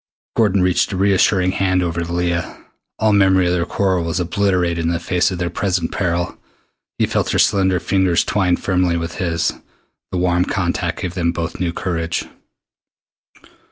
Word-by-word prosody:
Gordon 100 -4 +3
reached 90 -1 +2
a 95 - -3
reassuring 95 -1 +3
hand 95 -1 +1
over 85 0 -2
to 85 0 -4
Leah. 85 -1 -2 0.4
All 110 0 +2
memory 95 -2 +4
of 90 - +1
their 85 -1 0
quarrel 95 -3 0
was 85 0 -2
obliterated 90 -1 0
in 80 - 0
the 85 0 -1
face 90 -1 +1
of 95 - -4
their 85 -1 -2
present 90 -2 -1
peril. 85 -2 -2 0.6
He - - +2
felt - - -1
her - - 0
slender 95 -3 +3
fingers 95 0 +2
twine 90 -4 +1
firmly 90 -2 0
with 85 0 -5
his. 85 -2 0 0.6
The 95 - -2
warm 90 0 +2
contact - - -2
gave 90 - -3
them 85 -2 0
both 85 -1 -4
new 85 -1 0
courage. 85 -1 -2
90 Hz, 170 wpm, -19 LUFS, 85-95 Hz, 0.6 s, memory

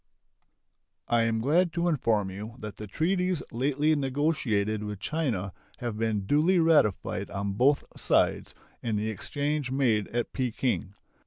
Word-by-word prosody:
I 115 -1 +3
am 115 -1 0
glad 165 +7 +3
to 170 +1 0
inform 110 - +1
you 105 +4 -7
that 105 -4 -8
the 105 - -7
treaties 180 - 0
lately 145 +5 +1
negotiated 130 -7 0
with 105 -2 -5
China 115 - -2 0.2
have 120 -4 -4
been 110 -2 0
duly 155 - +3
ratified 160 - +2
on 100 0 -3
both 135 +7 +3
sides - - +1 0.3
and 110 -3 -1
the 110 +1 -1
exchange 145 +5 -2
made 120 -6 +1
at 120 0 -3
Peking. 120 -5 -1
120 Hz, 140 wpm, -28 LUFS, 105-150 Hz, 0.3 s, I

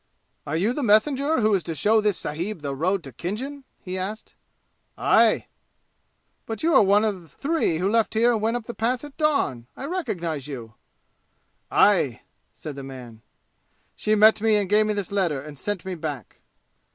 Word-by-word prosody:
"Are 150 +3 -1
you 205 +8 +1
the 295 - -3
messenger 270 +6 +3
who 215 0 +3
is 195 - +2
to 165 - -4
show 215 +6 +3
this 210 -3 +1
sahib 170 +5 -4
the 140 -1 -2
road 180 +5 0
to 135 - -9
Khinjan?" 260 - -5 0.2
he 185 0 -4
asked. 210 +4 -6 0.6
"Aye!" - - +4 1.0
"But 225 +2 -5
you 330 +1 +3
are - - +7
one 205 +2 +4
of 185 -8 -4
three 295 - 0
who 180 +3 0
left 225 +1 +1
here 235 +2 +4
and 220 - -1
went 225 +2 +1
up 235 - -8
the 235 - -6
Pass 240 +3 -1
at 290 -2 -10
dawn! 280 - 0
I 270 - -6
recognize 175 - -3
you." 120 -6 -8 1.0
"Aye!" - - +3 0.3
said 150 -3 -8
the 140 - -7
man. 125 -4 -10 0.7
"She 215 - +1
met 215 0 +6
me 220 -1 +3
and 205 -2 +1
gave 210 +2 +3
me 210 - 0
this 200 -2 -4
letter 180 -8 0
and 145 +2 -9
sent 205 -3 -4
me 190 - -3
back." 150 - -6
205 Hz, 185 wpm, -24 LUFS, 160-225 Hz, 1.0 s, are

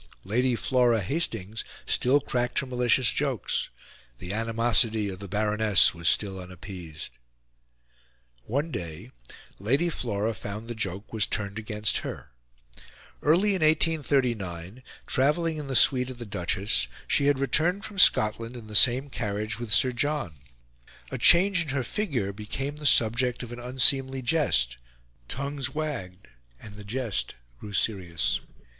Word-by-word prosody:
Lady 120 +6 +1
Flora 120 -1 +2
Hastings 110 - -2 0.2
still 130 +4 +2
cracked 125 -3 -2
her - - +2
malicious 125 -1 +2
jokes; 135 -4 -1 0.5
the 90 +9 -6
animosity 115 -1 +1
of 95 -1 -7
the 100 - -8
Baroness 105 0 +3
was 85 0 0
still 95 -2 0
unappeased. 90 - -9 1.3
One 145 +8 -2
day, 85 - -7 0.5
Lady 135 - +1
Flora 115 -7 -2
found 105 +2 -7
the 120 - -4
joke 100 -2 -5
was 110 -1 +1
turned 100 0 -3
against 105 -1 -1
her. - - -8 0.9
Early 175 +8 +3
in 190 -3 0
1839, 130 - 0 0.2
travelling 155 +4 +1
in 150 -2 -6
the 135 - -3
suite 125 +2 +5
of 130 - -8
the 120 - -7
Duchess, 95 - -1 0.2
she 140 - +2
had 145 -1 +3
returned 165 - 0
from 205 -3 -7
Scotland 115 -2 +4
in 115 - -10
the 105 0 -8
same 130 +5 +6
carriage 105 -3 -4
with 120 -3 -5
Sir 130 +4 +4
John. 145 - -2 0.7
A - - -4
change 180 +1 +5
in 160 - -4
her 135 -1 -1
figure 125 - -2
became 135 +8 -5
the 150 -1 -1
subject 120 +1 +3
of 120 - -8
an 120 - -7
unseemly 130 +1 +2
jest; 120 - +1 0.5
tongues 140 - -4
wagged; 115 -12 -5 0.3
and 105 - -11
the 105 0 -10
jest 105 - -3 0.2
grew 105 - -9
serious. 90 -6 0
120 Hz, 140 wpm, -26 LUFS, 105-140 Hz, 1.3 s, same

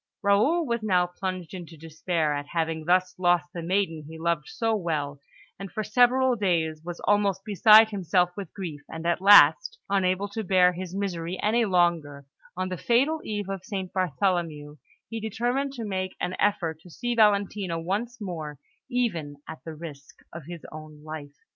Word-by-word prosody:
Raoul 220 +13 +3
was 235 -3 -1
now 185 -4 +2
plunged 180 0 -5
into 170 -3 -9
despair 160 0 -2
at 145 0 -4
having 160 -1 -2
thus 180 +1 +2
lost 175 -1 +2
the 170 - -5
maiden 165 -3 -1
he 160 - -9
loved 165 -2 -1
so 225 -1 -1
well, 150 -7 -3 0.4
and 195 -1 -7
for 215 - -3
several 250 +3 +3
days 165 -7 0
was 175 0 -7
almost 200 -2 +1
beside 215 +1 +7
himself 180 -2 +1
with 195 -5 -7
grief; 165 -7 -7
and 160 +1 -7
at 170 +1 +1
last, 205 - +7
unable 190 0 +1
to 220 +2 -4
bear 180 -1 +4
his 185 +1 -6
misery 185 -3 -3
any 230 +2 +2
longer, 170 -7 +1 0.3
on 185 0 -2
the 185 - -4
fatal 275 - +1
eve 205 -2 -4
of 195 -2 -5
St. 190 -2 -5
Bartholomew, 170 -4 -1 0.3
he 225 - -5
determined 240 +6 -2
to 235 -4 -5
make 185 -2 -3
an 180 - -2
effort 170 -6 0
to 180 - -15
see 240 +8 -3
Valentina 200 -5 +2
once 215 +8 -3
more 160 -7 -6 0.3
even 190 - -1
at 160 - -9
the 160 -1 -7
risk 150 -3 -10 0.2
of 165 -3 -8
his 170 -2 -9 0.4
life. 155 -2 -8
185 Hz, 170 wpm, -26 LUFS, 165-205 Hz, 0.4 s, beside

